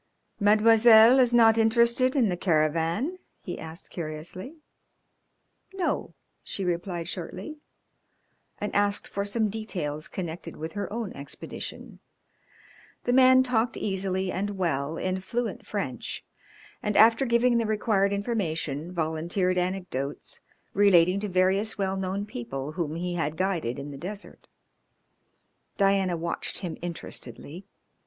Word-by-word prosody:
"Mademoiselle 220 Hz, +3 st, +7 dB
is 250 Hz, -2 st, +5 dB
not 225 Hz, -1 st, +6 dB
interested 235 Hz, +3 st, +3 dB
in 250 Hz, -5 st, +4 dB
the 180 Hz, -, 0 dB
caravan?" 170 Hz, -, 0 dB, 0.2 s
he -, -, -5 dB
asked 160 Hz, +2 st, -9 dB
curiously. 170 Hz, -, -6 dB, 1.2 s
"No," 370 Hz, -3 st, -2 dB, 0.3 s
she 195 Hz, -, -5 dB
replied 175 Hz, -1 st, -2 dB
shortly, 185 Hz, -, -6 dB, 1.0 s
and 210 Hz, -, -4 dB
asked 205 Hz, 0 st, +1 dB
for 200 Hz, -, -3 dB
some 215 Hz, +2 st, 0 dB
details 175 Hz, -9 st, -4 dB
connected 170 Hz, -2 st, -6 dB
with 160 Hz, +1 st, -6 dB
her 205 Hz, -1 st, -4 dB
own 225 Hz, -2 st, -4 dB
expedition. 140 Hz, 0 st, -8 dB, 1.0 s
The 245 Hz, -, +1 dB
man 260 Hz, 0 st, +7 dB
talked 240 Hz, -2 st, 0 dB
easily 190 Hz, -1 st, -1 dB
and 200 Hz, +2 st, -3 dB
well, 160 Hz, -3 st, -1 dB
in 185 Hz, 0 st, -1 dB
fluent 235 Hz, +4 st, -4 dB
French, -, -, -4 dB, 0.6 s
and 210 Hz, -1 st, -1 dB
after 225 Hz, +4 st, +6 dB
giving 235 Hz, -1 st, +3 dB
the 230 Hz, -, 0 dB
required 210 Hz, -2 st, +1 dB
information, 175 Hz, -, -2 dB
volunteered 175 Hz, +3 st, 0 dB
anecdotes 180 Hz, -7 st, -3 dB, 0.3 s
relating 185 Hz, -2 st, +5 dB
to 210 Hz, 0 st, -3 dB
various 190 Hz, +4 st, +2 dB
well 195 Hz, -1 st, 0 dB
known 190 Hz, +1 st, -2 dB
people 135 Hz, -, -5 dB
whom 160 Hz, -2 st, -3 dB
he 175 Hz, +1 st, -3 dB
had 160 Hz, -2 st, -2 dB
guided 175 Hz, -10 st, -1 dB
in 140 Hz, +1 st, -6 dB
the 140 Hz, -, -8 dB
desert. 200 Hz, +3 st, -8 dB, 1.3 s
Diana 195 Hz, -3 st, +2 dB
watched 170 Hz, +1 st, -3 dB
him 180 Hz, -4 st, -4 dB
interestedly. 170 Hz, -, -7 dB
190 Hz, 125 wpm, -27 LUFS, 165-220 Hz, 1.3 s, Mademoiselle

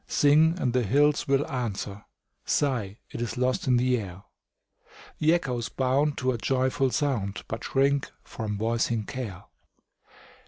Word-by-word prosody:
Sing, 155 Hz, +4 st, +4 dB
and 125 Hz, -6 st, 0 dB
the 125 Hz, -, +3 dB
hills 145 Hz, +7 st, +2 dB
will 140 Hz, +1 st, +2 dB
answer; 105 Hz, -7 st, -4 dB, 0.4 s
Sigh, 115 Hz, -8 st, 0 dB
it -, -, -5 dB
is 120 Hz, -, -3 dB
lost 130 Hz, +1 st, 0 dB
on 125 Hz, -1 st, +4 dB
the 125 Hz, 0 st, +2 dB
air; 95 Hz, -2 st, -8 dB, 1.0 s
The 155 Hz, +1 st, +4 dB
echoes 125 Hz, -, -2 dB
bound 135 Hz, +5 st, +1 dB
to 130 Hz, 0 st, +1 dB
a 120 Hz, -, -3 dB
joyful 130 Hz, +2 st, +1 dB
sound, 115 Hz, -, -1 dB
But 110 Hz, +1 st, -5 dB
shrink 140 Hz, +1 st, +1 dB
from 105 Hz, -2 st, -5 dB
voicing 115 Hz, +1 st, 0 dB
care. 105 Hz, -8 st, -6 dB
125 Hz, 145 wpm, -27 LUFS, 110-140 Hz, 1.0 s, Sing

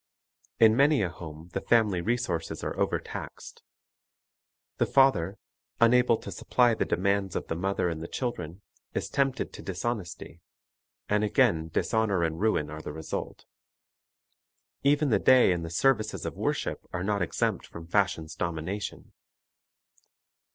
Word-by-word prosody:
In 110 Hz, -1 st, +7 dB
many 140 Hz, -1 st, +4 dB
a 90 Hz, -, 0 dB
home 80 Hz, 0 st, -10 dB
the 95 Hz, -, -2 dB
family 105 Hz, -6 st, +2 dB
resources 115 Hz, -5 st, -2 dB
are -, -, -3 dB
overtaxed. -, -, -4 dB, 1.2 s
The -, -, +1 dB
father, 105 Hz, -9 st, +3 dB, 0.4 s
unable 120 Hz, 0 st, +5 dB
to -, -, -7 dB
supply 120 Hz, -2 st, +2 dB
the -, -, 0 dB
demands 100 Hz, 0 st, 0 dB
of -, -, -2 dB
the -, -, -1 dB
mother 95 Hz, +1 st, 0 dB
and 80 Hz, -2 st, -3 dB
the 80 Hz, -, -5 dB
children, 95 Hz, -8 st, -4 dB, 0.3 s
is -, -, -2 dB
tempted 135 Hz, -2 st, 0 dB
to -, -, -9 dB
dishonesty, 95 Hz, -3 st, -5 dB, 0.7 s
and 105 Hz, 0 st, +1 dB
again 85 Hz, -6 st, +2 dB
dishonor 100 Hz, +2 st, +1 dB
and 80 Hz, 0 st, -1 dB
ruin 90 Hz, -9 st, +1 dB
are 75 Hz, 0 st, -7 dB
the -, -, -6 dB
result. 80 Hz, +1 st, -6 dB, 1.4 s
Even 145 Hz, +1 st, +3 dB
the 105 Hz, -, +4 dB
day 130 Hz, -3 st, +6 dB
and 85 Hz, -2 st, -1 dB
the 85 Hz, -, -5 dB
services 110 Hz, +4 st, +1 dB
of -, -, -3 dB
worship -, -, -2 dB
are 90 Hz, -, -3 dB
not 100 Hz, 0 st, 0 dB
exempt 85 Hz, -, -1 dB
from 85 Hz, -, -10 dB
fashion's 85 Hz, -4 st, 0 dB
domination. 85 Hz, +5 st, -4 dB
100 Hz, 140 wpm, -28 LUFS, 85-115 Hz, 1.4 s, In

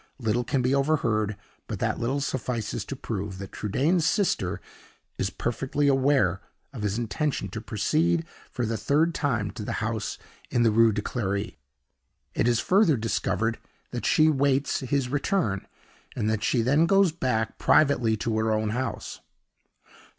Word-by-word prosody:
Little 120 Hz, -1 st, 0 dB
can 125 Hz, +1 st, 0 dB
be 125 Hz, +2 st, +2 dB
overheard; 120 Hz, -8 st, +1 dB, 0.3 s
but -, -, -4 dB
that -, -, -1 dB
little 135 Hz, +4 st, -1 dB
suffices 125 Hz, -5 st, -2 dB
to 140 Hz, -, -5 dB
prove 100 Hz, -6 st, -4 dB
that 95 Hz, 0 st, -8 dB
Trudaine's 145 Hz, -, +1 dB
sister 160 Hz, -, +1 dB, 0.6 s
is -, -, 0 dB
perfectly 135 Hz, +4 st, -1 dB
aware 135 Hz, -9 st, +3 dB, 0.3 s
of 120 Hz, -, -6 dB
his 105 Hz, 0 st, -1 dB
intention 120 Hz, -1 st, -2 dB
to 105 Hz, +3 st, -6 dB
proceed 160 Hz, -, +1 dB, 0.2 s
for 120 Hz, -, -2 dB
the 115 Hz, 0 st, -1 dB
third 150 Hz, -, +2 dB
time 120 Hz, -11 st, -1 dB
to 115 Hz, -, -8 dB
the -, -, -3 dB
house 110 Hz, -2 st, -2 dB, 0.3 s
in 120 Hz, -, +2 dB
the 115 Hz, -, +4 dB
Rue 115 Hz, +1 st, +5 dB
de 105 Hz, 0 st, -2 dB
Clery. 100 Hz, -4 st, -2 dB, 0.8 s
It -, -, +1 dB
is 120 Hz, -1 st, +3 dB
further 185 Hz, -, +3 dB
discovered 115 Hz, 0 st, -1 dB, 0.3 s
that -, -, -3 dB
she 155 Hz, -, +4 dB
awaits 140 Hz, -2 st, +2 dB
his 135 Hz, 0 st, -1 dB
return, 145 Hz, -, 0 dB, 0.5 s
and 105 Hz, -, -1 dB
that 110 Hz, -1 st, -1 dB
she 120 Hz, -3 st, +2 dB
then 145 Hz, +7 st, +3 dB
goes 195 Hz, -1 st, +4 dB
back 125 Hz, -8 st, -1 dB
privately 120 Hz, -7 st, +3 dB
to 110 Hz, +1 st, -1 dB
her 110 Hz, 0 st, +1 dB
own 110 Hz, 0 st, 0 dB
house. 125 Hz, +4 st, -4 dB
120 Hz, 160 wpm, -26 LUFS, 110-140 Hz, 0.8 s, Rue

